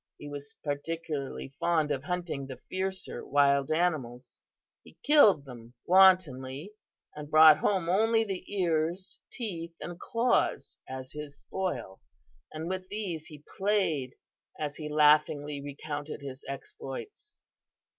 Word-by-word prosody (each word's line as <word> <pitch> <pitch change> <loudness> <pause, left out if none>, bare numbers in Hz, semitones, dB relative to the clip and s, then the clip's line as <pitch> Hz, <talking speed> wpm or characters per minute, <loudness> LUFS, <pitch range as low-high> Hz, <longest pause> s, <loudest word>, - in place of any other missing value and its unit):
He 145 - -9
was 145 0 -8
particularly 145 -2 -4
fond 160 -3 +2
of 140 -1 -2
hunting 170 -6 -3
the 130 - -8
fiercer 190 0 -3
wild 140 0 +3
animals. 140 -8 -1 0.4
He - - -18
killed 215 - +6
them 120 -2 -12
wantonly 180 -4 +4 0.4
and 150 -1 -8
brought 155 0 +8
home 190 -5 +1
only 225 +5 +3
the 195 -4 -4
ears, 175 -1 -1
teeth 170 -8 -5
and 175 0 -7
claws 230 - 0
as 130 0 -7
his 150 -1 -8
spoil, 125 - -4 0.5
and 155 +1 -5
with 185 0 -3
these 185 -7 -4
he 150 -2 -12 0.2
played 190 -10 +1 0.4
as 145 -1 -4
he 150 -1 -5
laughingly 150 -1 +3
recounted 145 +1 -6
his 135 0 -8
exploits. 140 - -8
155 Hz, 125 wpm, -29 LUFS, 140-185 Hz, 0.5 s, brought